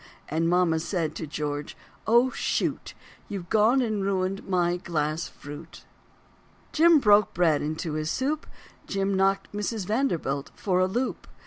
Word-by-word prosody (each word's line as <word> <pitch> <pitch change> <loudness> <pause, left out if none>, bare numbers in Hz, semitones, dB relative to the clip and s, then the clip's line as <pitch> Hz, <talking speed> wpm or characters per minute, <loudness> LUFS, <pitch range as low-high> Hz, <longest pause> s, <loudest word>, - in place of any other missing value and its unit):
And 165 +2 +1
mama 175 -2 +3
said 165 -1 -2
to 160 - -6
George, 145 0 -4 0.3
"Oh, 240 +3 +4
shoot, - - -2 0.3
You've 185 -4 -6
gone 225 +5 +4
and 215 -3 -1
ruined 195 0 -1
my 175 -1 +1
glass 160 -2 -2
fruit." 145 +3 -11 0.9
Jim 330 +1 +6
broke 210 -6 +4
bread 165 -4 +3
into 155 +1 -3
his 155 0 -2
soup, 285 - -1 0.4
Jim 195 0 -1
knocked 195 0 +1
Mrs. 210 0 -3
Vanderbilt 175 - -1
for 185 -3 0
a 185 - +3
loop. 245 +7 -3
185 Hz, 140 wpm, -26 LUFS, 160-210 Hz, 0.9 s, Jim